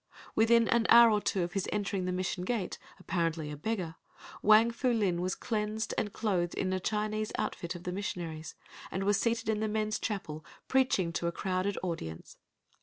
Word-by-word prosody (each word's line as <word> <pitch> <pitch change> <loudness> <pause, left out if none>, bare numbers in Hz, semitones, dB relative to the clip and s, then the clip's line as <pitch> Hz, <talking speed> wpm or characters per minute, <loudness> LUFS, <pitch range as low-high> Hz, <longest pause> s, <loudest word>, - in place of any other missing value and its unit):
Within 230 +1 +4
an 235 -1 +3
hour 235 -1 +9
or 210 -1 +2
two 190 -3 0
of 175 0 -4
his 195 -2 -1
entering 200 -2 -1
the 180 - -1
Mission 180 0 -2
gate, 210 -1 -2 0.2
apparently 165 -3 -1
a - - -5
beggar, 175 0 -3 0.4
Wang 215 +2 +6
Fu 250 +2 0
Lin 195 -7 +1
was 185 +1 -1
cleansed 215 0 -2
and 205 - -1
clothed 180 -7 -1
in 185 -1 -1
a 185 - 0
Chinese 215 +2 -1
outfit 170 +1 -3
of 175 - -8
the 180 - -3
missionary's, 170 -5 -5 0.3
and 190 - -2
was 205 0 +3
seated 230 -1 0
in 220 -1 +1
the 220 - 0
men's 215 0 -1
chapel 160 -8 -4 0.2
preaching 250 -10 +2
to 170 - -1
a - - 0
crowded 185 +2 -1
audience. 80 - -5
195 Hz, 185 wpm, -31 LUFS, 175-220 Hz, 0.4 s, hour